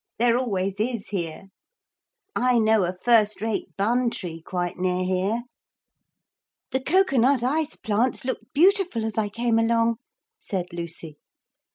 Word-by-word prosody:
There 235 0 +3
always 200 -6 -1
is, 230 -1 -2
here. 170 -5 -4 0.9
I 250 0 +3
know 220 -1 +4
a 180 +1 -4
first 220 -3 +4
rate 220 0 -2
bun 240 +5 +2
tree 165 -7 -6
quite 175 +1 -3
near 185 0 0
here.' 190 +6 0 1.3
'The 265 - +1
cocoa 350 -1 +2
nut 250 +1 +3
ice 300 +4 0
plants 230 +5 -1
looked 260 - -4
beautiful 355 - +3
as 220 0 -2
I 210 -1 0
came 230 +1 +1
along,' 230 0 +2 0.4
said 185 -3 -3
Lucy. 165 -3 -7
225 Hz, 140 wpm, -24 LUFS, 185-245 Hz, 1.3 s, know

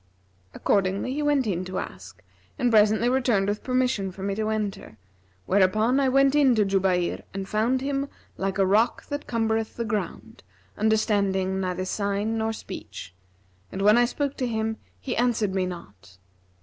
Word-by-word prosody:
Accordingly 200 +5 0
he 295 - -2
went 290 -3 +2
in 185 -4 -1
to 185 0 -5
ask 90 0 -8 0.3
and 245 - +1
presently 215 +1 +4
returned 245 -6 +2
with 205 +1 -2
permission 255 -7 0
for 190 +1 -9
me 200 0 -1
to 215 +2 -2
enter, 210 - -4 0.5
whereupon 215 +7 +3
I 270 -1 +3
went 275 +1 +4
in 280 -4 +4
to 210 -2 +3
Jubayr 190 -2 +1
and 195 -1 -4
found 230 +6 +1
him 275 0 -2 0.3
like 195 0 -2
a 195 - +3
rock 210 +5 +2
that 285 0 -4
cumbereth 225 -1 -1
the 235 - -2
ground, 210 -1 -4 0.3
understanding 200 -3 +1
neither 185 0 -2
sign 200 +3 -1
nor 220 0 0
speech; 90 - -8 0.6
and 195 - -3
when 210 +1 +6
I 240 0 +5
spoke 280 +3 -2
to 255 - -1
him 220 -1 -2 0.2
he 90 - -4
answered 230 -5 +1
me 185 -1 0
not. 100 - -10
215 Hz, 165 wpm, -25 LUFS, 190-240 Hz, 0.6 s, when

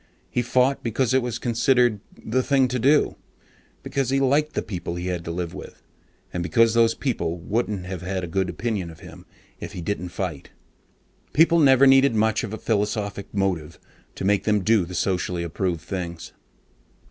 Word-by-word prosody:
He 125 - +1
fought 125 +3 +2
because 120 +2 0
it 130 - +4
was 120 -1 -3
considered 120 -1 +2 0.3
the 125 +4 +1
"thing 135 -1 +2
to 125 0 -1
do," 140 +5 +3 0.7
because 135 -3 -1
he 135 +1 +2
liked 145 +3 +2
the - - -1
people 90 -4 -5
he 90 +1 -5
had 90 -2 -3
to - - -5
live 85 0 -4
with, - - -11 0.5
and 90 - -2
because 110 +7 +3
those 115 -1 +3
people 110 -11 -2
wouldn't 100 +1 -2
have 90 -2 -6
a 95 0 -3
good 95 +2 -1
opinion 100 -1 -3
of 80 -1 -13
him - - -13 0.3
if - - -7
he 90 - -6
didn't 90 -1 -3
fight. 85 -5 -5 0.8
People 165 +2 +5
never 135 -3 +6
needed 135 -2 +5
much 110 0 +2
of 110 - -5
a 110 - -4
philosophic 105 -2 -2
motive 90 -6 -2 0.4
to - - -4
make 100 0 +2
them 105 -2 +1
do 110 -2 +3
the 90 +2 -8
socially 90 -1 -1
approved 85 0 -2
things. 85 -2 -6
105 Hz, 180 wpm, -24 LUFS, 90-125 Hz, 0.8 s, never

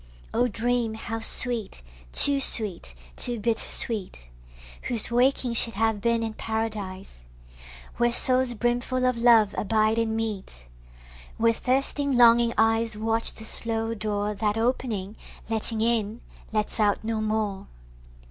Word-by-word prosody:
Oh 245 +2 0
dream 235 0 -3
how 225 +1 -7
sweet, 225 - +1 0.3
to 280 -1 +6
sweet, 205 - +4 0.2
too 240 -2 0
bitter 225 +1 -2
sweet, 185 - +1 0.6
Whose 235 -1 +4
waking 250 0 0
should 230 -1 +7
have 220 -1 -1
been 235 0 -1
in 225 -1 -5
Paradise, 210 - -6 0.7
Where 240 0 +1
souls 255 0 +3
brimfull 245 +3 -2
of 255 - -1
love 230 -3 +3
abide 215 +1 -1
and 225 -1 -2
meet; 200 - -6 0.7
Where 230 0 +1
thirsting 275 +2 -2
longing 235 -1 +4
eyes 225 0 0
Watch 225 +1 0
the 220 - -10
slow 225 0 +1
door 210 -1 -4
That 210 +1 -3
opening, 225 -4 -3 0.3
letting 220 0 -4
in, 225 -1 -2 0.3
lets 215 0 -2
out 205 -1 0
no 220 0 -4
more. 215 -2 -4
225 Hz, 130 wpm, -24 LUFS, 215-235 Hz, 0.7 s, should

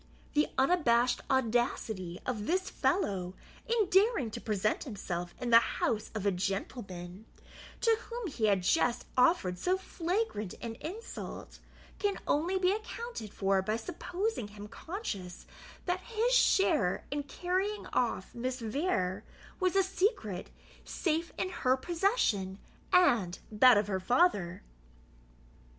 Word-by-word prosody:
The 300 0 +3
unabashed 255 -5 +3
audacity 225 -7 0
of 215 -5 -3
this 375 +2 0
fellow, 190 - 0 0.3
in 460 -4 +2
daring 385 - +3
to - - -6
present 215 -1 0
himself 175 -7 -5
in 245 -2 -2
the 230 - +10
house 220 -1 -1
of 210 -2 -3
a 200 - +4
gentleman, 195 0 -4 0.5
to 455 -1 +4
whom 475 -1 -4
he 260 - -1
had 195 -3 +2
just 240 - +2
offered 250 - +3
so 365 - +1
flagrant 350 - -2
an 230 -1 -5
insult, 405 +9 -7 0.4
can 405 -1 0
only 340 +6 +1
be 370 0 +3
accounted 435 - -5
for 195 -1 +1
by 215 +3 -1
supposing 360 - -3
him 205 0 -10
conscious 230 - -6 0.4
that 360 0 0
his 460 +5 0
share 335 - +3
in 290 +1 -1
carrying 370 +8 -2
off - - 0
Miss 255 +2 -3
Vere 220 - -1 0.4
was 370 -1 +1
a 390 - +5
secret, 375 - -1 0.3
safe 330 0 -1
in 370 - -1
her 260 -7 +1
possession 295 - 0 0.3
and 240 - +4
that 230 +2 +7
of 205 - +2
her 190 -2 -1
father. 195 - +2
255 Hz, 130 wpm, -31 LUFS, -, 0.5 s, the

